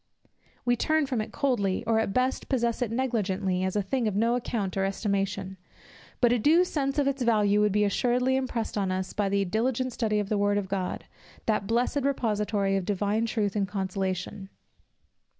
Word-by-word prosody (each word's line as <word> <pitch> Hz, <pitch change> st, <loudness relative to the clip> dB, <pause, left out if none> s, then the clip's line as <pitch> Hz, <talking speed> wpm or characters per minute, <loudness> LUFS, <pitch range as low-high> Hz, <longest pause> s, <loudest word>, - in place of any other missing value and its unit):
We 245 Hz, 0 st, +3 dB
turn 310 Hz, +5 st, +1 dB
from 255 Hz, -5 st, -1 dB
it 215 Hz, -, -6 dB
coldly, 205 Hz, -9 st, 0 dB
or 225 Hz, -1 st, +2 dB
at 225 Hz, -, 0 dB
best 255 Hz, +5 st, 0 dB
possess 235 Hz, -2 st, 0 dB
it 245 Hz, -, 0 dB
negligently, 200 Hz, -7 st, -1 dB
as 190 Hz, +1 st, -1 dB
a 205 Hz, -, +1 dB
thing 235 Hz, +4 st, -1 dB
of 205 Hz, -, -1 dB
no 230 Hz, +3 st, +2 dB
account 230 Hz, -5 st, -2 dB
or 195 Hz, -, +1 dB
estimation. 195 Hz, -1 st, -2 dB, 0.6 s
But 240 Hz, -1 st, +5 dB
a 245 Hz, -, +1 dB
due 320 Hz, +10 st, +5 dB
sense 275 Hz, -5 st, -2 dB
of 290 Hz, -, +3 dB
its 275 Hz, -1 st, -1 dB
value 210 Hz, -3 st, +3 dB
would 210 Hz, -1 st, +3 dB
be 210 Hz, +1 st, +2 dB
assuredly 250 Hz, +5 st, +1 dB
impressed 245 Hz, -5 st, -2 dB
on 190 Hz, -2 st, 0 dB
us 185 Hz, 0 st, -3 dB
by 205 Hz, -2 st, 0 dB
the 200 Hz, 0 st, +1 dB
diligent 245 Hz, +5 st, -1 dB
study 220 Hz, -3 st, 0 dB
of 205 Hz, -1 st, -1 dB
the 210 Hz, -, +1 dB
word 205 Hz, 0 st, +2 dB
of 200 Hz, -2 st, -2 dB
God, 190 Hz, -1 st, -3 dB, 0.4 s
that 210 Hz, -3 st, 0 dB
blessed 245 Hz, +5 st, +1 dB
repository 210 Hz, -7 st, 0 dB
of 195 Hz, -, 0 dB
divine 205 Hz, +3 st, 0 dB
truth 215 Hz, -3 st, -1 dB
and 200 Hz, -2 st, +1 dB
consolation. 190 Hz, 0 st, -3 dB
210 Hz, 190 wpm, -27 LUFS, 195-245 Hz, 0.6 s, But